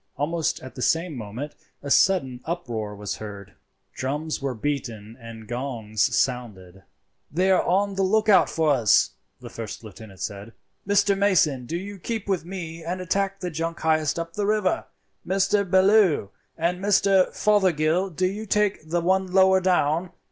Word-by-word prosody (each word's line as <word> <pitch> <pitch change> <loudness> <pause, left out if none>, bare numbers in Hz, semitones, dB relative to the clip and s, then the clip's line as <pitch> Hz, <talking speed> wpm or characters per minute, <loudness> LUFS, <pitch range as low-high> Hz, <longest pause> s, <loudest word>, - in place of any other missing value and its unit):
Almost 160 +3 -1
at 130 -1 -10
the 130 - -8
same 165 +3 +1
moment 120 +6 -6 0.3
a 140 - -4
sudden 135 -11 +3
uproar 120 -12 -4
was 100 -1 -5
heard—drums 110 +9 -6
were 135 -2 -2
beaten 115 -4 -4
and 115 -1 -10
gongs 120 -2 -1
sounded. 105 -8 -2 0.5
"They 185 +5 +2
are 185 - +4
on 200 +2 +1
the 195 - -1
look 215 +3 +2
out 205 - +5
for 160 -2 +1
us," 120 -7 +4 0.3
the - - -9
first 115 0 -7
lieutenant 105 -2 -12
said. 100 +3 -6 0.3
"Mr. 200 0 +3
Mason, 165 -10 +2
do 170 - -2
you 200 +2 -7
keep 220 +2 -4
with 190 -4 -1
me 170 -3 -7
and 175 +3 -3
attack 195 +2 -1
the 180 -1 -3
junk 165 +2 -4
highest 155 -2 +1
up 165 0 -4
the 205 +1 -1
river; 210 -3 +1 0.4
Mr. 195 +1 +1
Bellew 190 - +4 0.3
and 170 +2 0
Mr. 195 -1 +3
Fothergill, 185 -3 +2
do 185 +1 -1
you 210 +4 -3
take 205 -6 0
the 170 +1 0
one 190 +1 +1
lower 190 0 +5
down. 175 -1 +1
165 Hz, 160 wpm, -24 LUFS, 125-190 Hz, 0.5 s, out